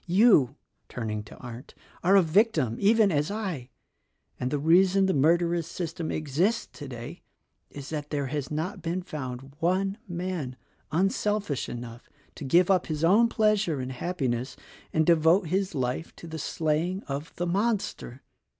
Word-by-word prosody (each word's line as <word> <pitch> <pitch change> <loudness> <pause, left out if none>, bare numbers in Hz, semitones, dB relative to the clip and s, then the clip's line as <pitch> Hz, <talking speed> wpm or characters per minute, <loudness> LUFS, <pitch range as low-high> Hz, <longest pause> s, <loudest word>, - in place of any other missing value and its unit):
You," 175 - +5 0.3
turning 110 -3 -3
to - - -13
Arndt, 120 +1 -10 0.3
"are 190 +3 +5
a 195 - +7
victim, 160 - +2
even 215 0 +4
as 150 -1 +1
I; 190 - -4 0.7
and 125 - -1
the 145 - 0
reason 185 +6 +4
the 190 - +2
mur 155 +5 +4
derous 170 -1 -1
system 165 -1 -4
exists 160 - 0
today 125 -6 -8 0.5
is 140 0 -9
that 150 -2 -4
there 145 -2 -1
has 135 0 -3
not 160 +6 -3
been 170 +3 -2
found 135 -5 -6
one 195 +5 0
man 175 -7 -4 0.4
unselfish 195 -1 0
enough 120 0 -8 0.2
to - - -9
give 175 +7 +4
up 185 -2 +2
his 155 -1 -3
own 205 +8 +5
pleas 215 -2 +2
ure 155 -5 -1
and 130 0 -4
happiness 130 -4 -2 0.4
and 160 0 +2
devote 165 +2 +4
his 190 +2 0
life 130 +4 -2
to - - -11
the 160 -1 -6
slaying 165 +6 -1
of 145 +3 -5
the 175 - -2
monster. 195 - -1
165 Hz, 160 wpm, -27 LUFS, 140-185 Hz, 0.7 s, a